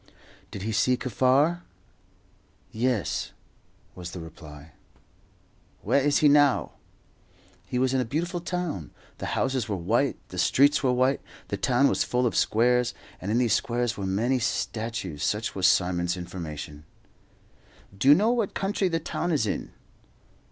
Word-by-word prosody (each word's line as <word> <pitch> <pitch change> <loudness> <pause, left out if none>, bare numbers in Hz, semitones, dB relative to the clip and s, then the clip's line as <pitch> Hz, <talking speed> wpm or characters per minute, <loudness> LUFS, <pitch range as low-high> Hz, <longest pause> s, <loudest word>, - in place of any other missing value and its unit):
Did 100 - -7
he 110 - -2
see 125 +4 +2
Kaffar? 135 +8 +2 1.1
"Yes," 120 -4 -1 0.6
was 90 -1 -7
the 90 - -6
reply. 80 -2 -11 1.1
"Where 140 - +2
is 145 0 +3
he - - +9
now?" 145 -2 +4 1.0
He 125 - -3
was 130 +1 +1
in 130 - +2
a - - -2
beautiful 170 +8 -2
town. 175 - -4 0.3
The - - -4
houses 130 -4 0
were 100 - 0
white, 85 -2 0
the - - -6
streets 145 +2 +4
were 130 - +2
white; 130 +2 +2 0.3
the - - -1
town 130 +2 +3
was - - +1
full 125 0 0
of 120 - 0
squares, 125 +2 +2 0.3
and 95 - -4
in 110 - +1
these 120 -4 +2
squares 120 0 0
were 100 -2 -4
many 115 +7 +1
statues. 110 - -3
Such 105 +2 -1
was 95 -2 +2
Simon's 90 -1 +1
information. 80 -4 -7 1.1
"Do 100 - -1
you 145 - +9
know 215 +6 +3
what 230 -5 -1
country 195 0 0
the 165 -2 0
town 175 +2 -3
is 145 -8 +1
in?" 105 - -3
120 Hz, 150 wpm, -26 LUFS, 95-140 Hz, 1.1 s, he